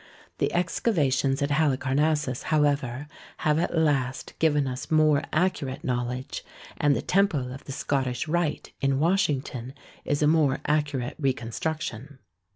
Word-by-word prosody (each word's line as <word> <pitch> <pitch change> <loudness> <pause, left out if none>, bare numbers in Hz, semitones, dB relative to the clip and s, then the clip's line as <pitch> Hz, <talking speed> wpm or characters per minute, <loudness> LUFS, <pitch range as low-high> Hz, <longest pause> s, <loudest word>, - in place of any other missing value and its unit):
The - - +2
excava 170 - +1
tions 135 +1 +1
at 140 - -1
Halicarnassus, 145 -1 +1
however, 145 -4 +1 0.3
have 150 0 +2
at 170 - -1
last 140 -5 0
given 150 -3 +3
us 125 -2 -5
more 155 -2 +4
accurate 155 -6 0
knowledge, 125 +1 -3 0.3
and 145 -1 +3
the - - -2
Temple 150 -10 +1
of 135 - -10
the - - -6
Scottish 135 -1 -1
Rite 170 -1 -1
in 135 -1 +2
Washington 145 - 0 0.3
is 145 +1 0
a - - +5
more 150 -4 +3
accurate 145 -4 0
reconstruction. 135 +1 -3
145 Hz, 135 wpm, -26 LUFS, 130-155 Hz, 0.3 s, a